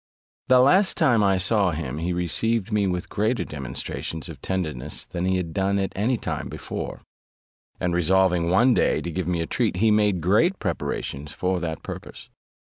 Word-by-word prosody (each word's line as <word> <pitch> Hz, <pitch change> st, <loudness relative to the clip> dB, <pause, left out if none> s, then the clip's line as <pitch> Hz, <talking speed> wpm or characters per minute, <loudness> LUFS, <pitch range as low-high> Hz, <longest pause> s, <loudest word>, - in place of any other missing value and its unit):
The 130 Hz, -, +6 dB
last 185 Hz, +10 st, +4 dB
time 120 Hz, -10 st, +4 dB
I 95 Hz, -1 st, +3 dB
saw 95 Hz, +1 st, +2 dB
him, 75 Hz, -4 st, -4 dB
he 85 Hz, +2 st, -2 dB
received 100 Hz, +5 st, 0 dB
me 105 Hz, -2 st, +2 dB
with 90 Hz, +1 st, -2 dB
greater 110 Hz, +4 st, 0 dB
demonstrations 75 Hz, +3 st, -5 dB
of -, -, -10 dB
tenderness 75 Hz, -7 st, -3 dB
than 90 Hz, +1 st, -4 dB
he 95 Hz, 0 st, +2 dB
had 85 Hz, -3 st, -4 dB
done 100 Hz, +2 st, +1 dB
at 95 Hz, -1 st, -2 dB
any 115 Hz, +6 st, +1 dB
time -, -, -4 dB
before; -, -, -6 dB, 0.8 s
and 90 Hz, -1 st, 0 dB
resolving 90 Hz, 0 st, +3 dB
one 120 Hz, +8 st, +5 dB
day -, -, +2 dB
to 85 Hz, -, -4 dB
give 85 Hz, +1 st, -3 dB
me 85 Hz, -2 st, 0 dB
a -, -, -1 dB
treat, 110 Hz, +2 st, 0 dB
he 110 Hz, +4 st, +3 dB
made 105 Hz, -3 st, +3 dB
great 105 Hz, -, +3 dB
preparations 75 Hz, +2 st, -4 dB
for 90 Hz, +2 st, -1 dB
that 80 Hz, -2 st, -4 dB
purpose. -, -, -9 dB
95 Hz, 180 wpm, -24 LUFS, 85-105 Hz, 0.8 s, The